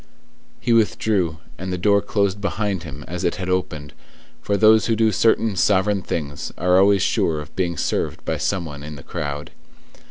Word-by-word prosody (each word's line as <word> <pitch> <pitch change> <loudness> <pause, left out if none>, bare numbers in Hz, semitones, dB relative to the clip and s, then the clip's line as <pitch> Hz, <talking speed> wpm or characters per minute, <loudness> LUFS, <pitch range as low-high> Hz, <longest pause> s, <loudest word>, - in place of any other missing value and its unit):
He 120 - +1
withdrew, 105 -6 +1 0.2
and 95 0 -4
the 90 - -2
door 100 +2 +3
closed 100 -1 0
behind 100 -2 -1
him 75 -4 -9
as 90 +1 -5
it 85 - +1
had 95 -1 -5
opened, 75 -6 -2 0.5
for 100 - 0
those 110 +1 +5
who 115 - +2
do 110 0 +3
certain 110 0 +2
sovereign 100 +1 +2
things 70 -5 -4
are 90 +1 +3
always 100 -1 +4
sure 80 -2 +1
of 75 0 -10
being 85 -3 -1
served - - -2
by - - -1
some 95 -4 -1
one 75 -3 -8
in 75 +1 -8
the 70 - -11
crowd. 75 0 -5
95 Hz, 185 wpm, -22 LUFS, 80-105 Hz, 0.5 s, those